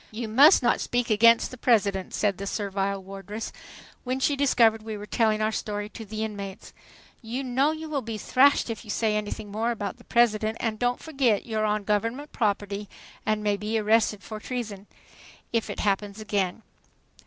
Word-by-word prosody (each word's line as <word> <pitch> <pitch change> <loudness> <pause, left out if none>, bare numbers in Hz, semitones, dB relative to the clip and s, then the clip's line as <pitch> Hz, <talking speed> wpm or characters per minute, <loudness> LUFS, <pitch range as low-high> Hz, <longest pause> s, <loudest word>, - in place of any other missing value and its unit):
"You 225 +1 -5
must 275 - +6
not 240 - +2
speak 245 -1 -1
against 230 +2 +5
the 255 - -10
President," 200 -6 +2
said 200 -3 0
the 200 - -4
servile 195 -1 -2
wardress, 195 +3 -7 0.5
when 255 +1 -2
she 285 +2 +2
discovered 235 -5 +3
we 215 -1 -6
were 205 - -7
telling 215 0 +1
our 215 - +1
story 205 -1 -3
to 225 - -9
the 215 +1 -4
inmates. 200 -3 -6 0.5
"You 240 +3 -4
know 260 +3 +2
you 315 0 -6
will 295 -3 -2
be 225 -2 -5
thrashed 265 +2 +3
if 225 - -6
you 215 - -14
say 215 0 +1
anything 210 0 -4
more 220 +3 -1
about 220 0 -3
the 240 - -17
President; 220 -2 +2
and 220 -2 -2
don't 245 0 +1
forget 270 -9 +1
you're 220 -2 -1
on 210 0 0
Government 230 +8 -1
property 205 -2 -1 0.4
and 215 0 +1
may 205 -1 +1
be 215 +2 -2
arrested 215 -2 +2
for 215 +2 -7
treason 215 -5 -5 0.7
if 230 -1 0
it - - -4
happens 200 0 -1
again." 205 -1 -2
215 Hz, 185 wpm, -26 LUFS, 205-240 Hz, 0.7 s, must